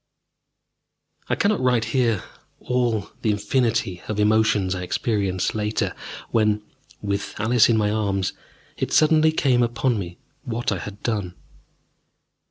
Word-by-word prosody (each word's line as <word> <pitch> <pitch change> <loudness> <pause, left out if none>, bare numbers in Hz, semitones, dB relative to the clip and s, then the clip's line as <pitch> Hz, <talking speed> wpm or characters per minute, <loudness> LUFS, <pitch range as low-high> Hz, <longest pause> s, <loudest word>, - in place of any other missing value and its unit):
I - - +2
cannot 205 0 +1
write 125 -3 +2
here 115 -7 +2 0.4
all 120 -5 -1
the 110 - 0
infinity 105 -3 0
of 105 -1 -3
emotions 105 -3 +3
I 90 - -4
experienced 95 -1 -1
later, 105 0 -1 0.4
when, 105 -2 +2 0.4
with 100 0 -3
Alice 115 +2 +4
in 115 - +3
my 105 -1 +1
arms, 100 -3 -1 0.4
it - - -2
suddenly 155 0 +5
came 130 -5 +2
upon 120 -1 +1
me 90 -2 -6 0.2
what 120 -4 -2
I 100 - -1
had 100 +2 -9
done. 100 -6 -2
110 Hz, 130 wpm, -23 LUFS, 100-120 Hz, 0.4 s, suddenly